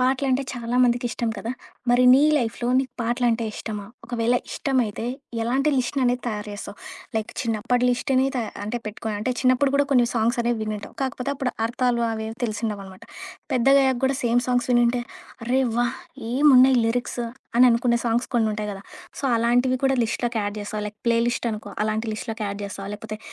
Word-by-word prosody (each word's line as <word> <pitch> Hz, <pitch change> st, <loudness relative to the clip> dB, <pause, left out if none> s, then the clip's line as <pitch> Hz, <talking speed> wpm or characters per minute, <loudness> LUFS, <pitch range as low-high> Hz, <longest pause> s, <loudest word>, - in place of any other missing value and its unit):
పాటలంటే 260 Hz, +1 st, +2 dB
చాలామందికిష్టం 240 Hz, -1 st, +1 dB
కదా! 230 Hz, -, -4 dB, 0.4 s
మరి 245 Hz, +1 st, +5 dB
నీ 265 Hz, -, +7 dB, 0.2 s
లైఫ్‌లో 240 Hz, -2 st, -1 dB
నీకు 265 Hz, 0 st, -2 dB
పాటలంటే 235 Hz, 0 st, +1 dB
ఇష్టమా? 210 Hz, -2 st, -6 dB, 0.2 s
ఒకవేళ 235 Hz, 0 st, 0 dB, 0.2 s
ఇష్టమైతే 245 Hz, -6 st, -1 dB, 0.4 s
ఎలాంటి 265 Hz, +6 st, +1 dB
లిస్ట్‌ననేది 250 Hz, -1 st, 0 dB
తయారు 210 Hz, -2 st, -3 dB
జేస్తావు? 205 Hz, 0 st, -8 dB, 0.4 s
లైక్ 220 Hz, -1 st, -2 dB
చిన్నప్పటి 240 Hz, +2 st, 0 dB
లిస్టుని 260 Hz, +1 st, +1 dB
త -, -, 0 dB, 0.3 s
అంటే 235 Hz, +4 st, -3 dB
పెట్టుకొని 215 Hz, 0 st, -4 dB
అంటే 255 Hz, -, -1 dB
చిన్నప్పుడు 255 Hz, +2 st, +3 dB
గూడా 285 Hz, 0 st, +4 dB
కొన్ని 245 Hz, -3 st, +5 dB
సాంగ్స్ 235 Hz, +2 st, +1 dB
అనేవి 235 Hz, -1 st, 0 dB
వినుంటావు, 215 Hz, -1 st, -5 dB
కాకపోతే 260 Hz, +1 st, -2 dB
అప్పుడు 265 Hz, -2 st, -2 dB
అర్థాలు 235 Hz, 0 st, 0 dB
అవేవి 220 Hz, 0 st, -4 dB
తెలిసిండవనమాట. 210 Hz, -4 st, -4 dB, 0.5 s
పెద్దగయ్యాక 265 Hz, +1 st, +4 dB
గూడా 265 Hz, 0 st, +1 dB
సేమ్ 240 Hz, 0 st, +3 dB
సాంగ్స్ 245 Hz, -1 st, +1 dB
వినుంటే, 240 Hz, 0 st, +3 dB, 0.5 s
అరె! 255 Hz, +2 st, +2 dB, 0.2 s
వాహ్! 240 Hz, +2 st, 0 dB, 0.3 s
ఏమున్నాయి 260 Hz, -1 st, +6 dB
లిరిక్స్ 240 Hz, +1 st, -1 dB, 0.4 s
అని 245 Hz, -, +7 dB
అనుకునే 235 Hz, 0 st, +2 dB
సాంగ్స్ 235 Hz, +2 st, 0 dB
కొన్నుంటయి 215 Hz, -2 st, 0 dB
గదా! 195 Hz, 0 st, -10 dB, 0.4 s
సో, -, -, -6 dB
అలాంటివి 245 Hz, +3 st, +2 dB
కూడా 270 Hz, 0 st, +2 dB
లిస్ట్‌లోకి 235 Hz, 0 st, -1 dB
యాడ్ 205 Hz, +1 st, -3 dB
జేస్తావా? 210 Hz, +1 st, -4 dB
లైక్ 210 Hz, 0 st, -15 dB
ప్లే 235 Hz, 0 st, +4 dB
లిస్ట్ 240 Hz, 0 st, -1 dB
అనుకో, 215 Hz, 0 st, -7 dB
అలాంటి 215 Hz, +1 st, -1 dB
లిస్ట్‌లోకి 220 Hz, 0 st, -4 dB
యాడ్ 200 Hz, +1 st, -5 dB
జేస్తావా? 200 Hz, 0 st, -6 dB
లేకపోతే 215 Hz, 0 st, -7 dB
240 Hz, 160 wpm, -24 LUFS, 220-255 Hz, 0.5 s, నీ